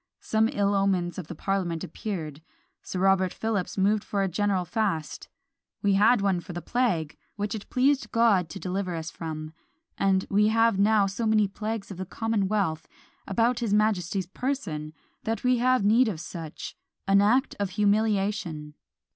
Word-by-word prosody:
Some 220 Hz, +1 st, +2 dB
ill 200 Hz, 0 st, +1 dB
omens 190 Hz, -3 st, 0 dB
of 170 Hz, -, -7 dB
the 175 Hz, -, -7 dB
parliament 175 Hz, -2 st, -2 dB
appeared. 160 Hz, -5 st, -5 dB, 0.4 s
Sir -, -, -6 dB
Robert 190 Hz, -1 st, +3 dB
Philips 215 Hz, -5 st, -2 dB
moved 205 Hz, +2 st, +2 dB
for 200 Hz, -1 st, -1 dB
a -, -, +1 dB
general 190 Hz, 0 st, 0 dB
fast: 195 Hz, -8 st, -2 dB, 0.5 s
"we 200 Hz, -1 st, +3 dB
had 215 Hz, +3 st, +4 dB
one 195 Hz, -3 st, +1 dB
for 175 Hz, +1 st, -9 dB
the 175 Hz, -, -4 dB
plague 185 Hz, -12 st, 0 dB, 0.2 s
which 205 Hz, 0 st, -3 dB
it 215 Hz, -2 st, -7 dB
pleased 275 Hz, +2 st, +2 dB
God 215 Hz, -8 st, +3 dB
to 195 Hz, -, -7 dB
deliver 185 Hz, -1 st, -3 dB
us 160 Hz, 0 st, -5 dB
from, 155 Hz, -1 st, -6 dB, 0.5 s
and 190 Hz, -1 st, +2 dB
we 210 Hz, +1 st, +3 dB
have 225 Hz, -2 st, +3 dB
now 210 Hz, 0 st, +4 dB
so 200 Hz, +4 st, -2 dB
many 215 Hz, -1 st, +3 dB
plagues 210 Hz, +1 st, -5 dB
of 190 Hz, -, -7 dB
the 185 Hz, 0 st, -5 dB
commonwealth 200 Hz, -7 st, -1 dB, 0.4 s
about 230 Hz, +4 st, +1 dB
his 220 Hz, -4 st, +1 dB
majesty's 195 Hz, -3 st, +1 dB
person, 175 Hz, -, -3 dB, 0.3 s
that 225 Hz, +1 st, -2 dB
we 250 Hz, -1 st, +3 dB
have 255 Hz, -3 st, +3 dB
need 230 Hz, +4 st, +5 dB
of 190 Hz, -7 st, -3 dB
such, 165 Hz, -2 st, -7 dB, 0.3 s
an 195 Hz, 0 st, +5 dB
act 250 Hz, +7 st, +2 dB
of 200 Hz, -2 st, -1 dB
humiliation." 205 Hz, -7 st, 0 dB
200 Hz, 165 wpm, -27 LUFS, 180-220 Hz, 0.5 s, need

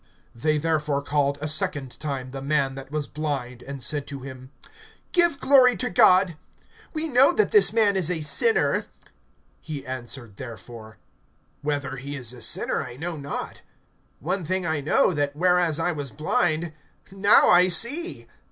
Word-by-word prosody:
(24)They 150 Hz, +6 st, 0 dB
therefore 150 Hz, -3 st, -1 dB
called 145 Hz, -1 st, 0 dB
a 155 Hz, -, -3 dB
second 155 Hz, -5 st, -2 dB
time 135 Hz, -4 st, -5 dB
the 135 Hz, 0 st, -7 dB
man 140 Hz, -1 st, 0 dB
that 135 Hz, 0 st, -10 dB
was 150 Hz, 0 st, -3 dB
blind, 140 Hz, -6 st, -5 dB
and 140 Hz, -2 st, -7 dB
said 145 Hz, -2 st, -1 dB
to 140 Hz, -2 st, -8 dB
him: 130 Hz, -1 st, -10 dB, 0.6 s
Give 345 Hz, -5 st, +4 dB
glory 260 Hz, -3 st, +5 dB
to 250 Hz, -2 st, -2 dB
God; 180 Hz, -2 st, +4 dB, 0.5 s
we 320 Hz, 0 st, -2 dB
know 265 Hz, 0 st, +5 dB
that 430 Hz, -, +1 dB
this 420 Hz, -2 st, +6 dB
man 215 Hz, -3 st, +2 dB
is 180 Hz, -4 st, +2 dB
a 170 Hz, -3 st, -1 dB
sinner. 445 Hz, -, +2 dB, 0.8 s
(25)He 145 Hz, -4 st, -7 dB
answered 120 Hz, -4 st, -6 dB
therefore: 115 Hz, -2 st, -10 dB, 0.6 s
Whether 145 Hz, -2 st, -3 dB
he 140 Hz, +2 st, -7 dB
is 125 Hz, -3 st, -5 dB
a 125 Hz, -, -11 dB
sinner, -, -, +1 dB
I 120 Hz, -, -9 dB
know 170 Hz, +3 st, -5 dB
not; 140 Hz, -1 st, -6 dB, 0.6 s
one 185 Hz, +4 st, -3 dB
thing 185 Hz, +3 st, -2 dB
I 160 Hz, -3 st, -1 dB
know, 155 Hz, +5 st, +2 dB
that, 145 Hz, -2 st, -2 dB
whereas 175 Hz, -1 st, +2 dB
I 175 Hz, +2 st, 0 dB
was 145 Hz, -4 st, -5 dB
blind, 155 Hz, +4 st, -1 dB, 0.4 s
now 195 Hz, +1 st, +5 dB
I 180 Hz, +1 st, +6 dB
see. 280 Hz, -, -1 dB
150 Hz, 160 wpm, -24 LUFS, 135-180 Hz, 0.8 s, this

